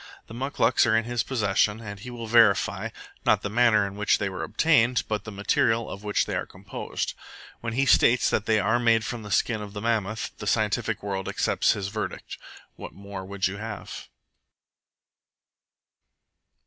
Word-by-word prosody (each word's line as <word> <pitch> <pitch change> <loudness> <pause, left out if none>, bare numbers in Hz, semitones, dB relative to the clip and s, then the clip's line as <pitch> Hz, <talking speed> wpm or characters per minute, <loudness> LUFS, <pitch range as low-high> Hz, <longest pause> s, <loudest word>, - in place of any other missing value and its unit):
The - - -12
muclucs 130 0 +2
are 110 -1 +4
in 115 - +1
his 120 0 -1
possession, 105 -3 +1
and 100 -3 -8
he 125 +5 -8
will 120 -2 -7
verify, 110 -3 +3 0.3
not - - +3
the 105 - -3
manner 115 -3 +4
in 100 0 -6
which 105 0 +2
they 105 - -2
were 95 - -6
obtained, 125 0 +2
but 105 -1 -3
the 105 - -7
material 110 +3 +1
of 100 - -8
which 105 -1 +1
they - - -3
are - - -2
composed. - - -5 0.5
When 115 -1 -4
he 135 +3 +1
states 125 -2 +4
that 110 - 0
they 110 -1 +3
are 110 +4 +2
made 115 -2 +3
from 120 -2 -4
the 105 - -9
skin 105 +5 +1
of 105 -1 -8
the 105 - -6
mammoth, 110 -1 -1
the - - -6
scientific - - 0
world 95 -2 -3
accepts - - +1
his 100 -1 -4
verdict. 110 +1 -5 0.4
What - - -9
more 100 -1 -8
would 100 0 -3
you 95 +1 -1
have? 105 -1 -7
110 Hz, 180 wpm, -26 LUFS, 100-115 Hz, 0.5 s, are